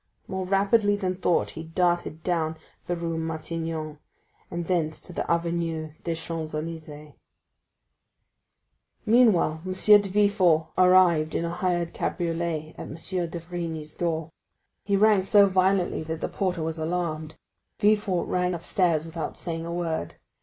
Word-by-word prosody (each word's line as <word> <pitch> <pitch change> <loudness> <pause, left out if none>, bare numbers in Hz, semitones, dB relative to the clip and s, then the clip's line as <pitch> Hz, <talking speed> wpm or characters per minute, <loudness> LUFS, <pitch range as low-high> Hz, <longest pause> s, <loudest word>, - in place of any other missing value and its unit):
More 190 -1 -3
rapidly 205 +2 +3
than 185 -2 -2
thought, 180 -2 +1
he 160 - -7
darted 175 -1 -1
down 160 -3 -1 0.3
the 175 - 0
Rue 165 -1 -3
Matignon, 160 -1 -4 0.5
and 170 0 -4
thence 160 -3 0
to 180 - -7
the - - -3
Avenue 170 -2 -1
des 165 -1 -1
Champs 160 -1 -5
Élysées. 155 -2 -7 1.9
Meanwhile 215 -9 +4
M. 185 0 -3
de 205 +1 +5
Villefort 190 -5 +3
arrived 180 -4 +4
in 170 - 0
a 170 - -2
hired 175 -1 -1
cabriolet 165 -2 -2
at - - -6
M. - - -7
d'Avrigny's 170 -2 -4
door. 165 -2 -2 0.5
He 200 - +2
rang 210 -1 +5
so 200 +1 +5
violently 190 -2 +2
that 160 0 -4
the - - -2
porter 180 -4 -1
was 160 0 -3
alarmed. 160 -2 -3 0.4
Villefort 205 -4 +2
ran 180 0 0
upstairs 170 -2 +1
without 165 -1 -5
saying 165 -1 -4
a - - -4
word. 165 - -3
170 Hz, 140 wpm, -26 LUFS, 160-185 Hz, 1.9 s, de